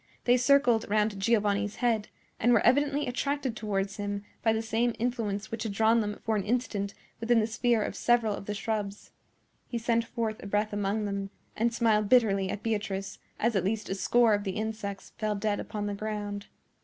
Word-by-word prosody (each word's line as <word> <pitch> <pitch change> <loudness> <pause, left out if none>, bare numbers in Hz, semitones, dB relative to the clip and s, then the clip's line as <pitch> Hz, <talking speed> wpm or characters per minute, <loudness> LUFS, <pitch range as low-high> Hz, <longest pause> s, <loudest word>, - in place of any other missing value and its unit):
They 245 - +5
circled 250 -3 +3
round 210 -1 +1
Giovanni's 205 -1 +1
head, 230 -4 +1 0.3
and 240 +2 +4
were 225 - +3
evidently 285 +3 +3
attracted 270 0 -1
towards 200 -2 -2
him 205 0 -3 0.2
by 225 - +3
the 220 0 0
same 230 +1 0
influence 220 -4 -2
which 225 -1 -4
had 220 -3 -2
drawn 225 +3 +4
them 210 -1 -2
for 220 - 0
an 205 - 0
instant 210 -3 -1 0.2
within 230 0 +3
the 215 - +2
sphere 225 0 +1
of - - -4
several 235 -3 +2
of 200 - -7
the 210 - -2
shrubs. 210 -2 -3 0.6
He 240 - -3
sent 230 0 +1
forth 225 -2 -3
a - - -7
breath 210 +1 0
among 205 +1 -1
them, 200 -1 -3 0.3
and 235 +2 +1
smiled 220 -3 +2
bitterly 200 -6 +4
at 205 - -4
Beatrice 200 -3 -2 0.2
as 230 0 +1
at 190 - +2
least 210 +3 -2
a - - 0
score 230 +3 +3
of 205 0 +1
the 190 -2 -3
insects 215 -2 -4
fell 215 -1 0
dead 205 0 -1
upon 210 -1 -4
the 205 - -2
ground. 205 -1 -4
215 Hz, 195 wpm, -29 LUFS, 205-235 Hz, 0.6 s, They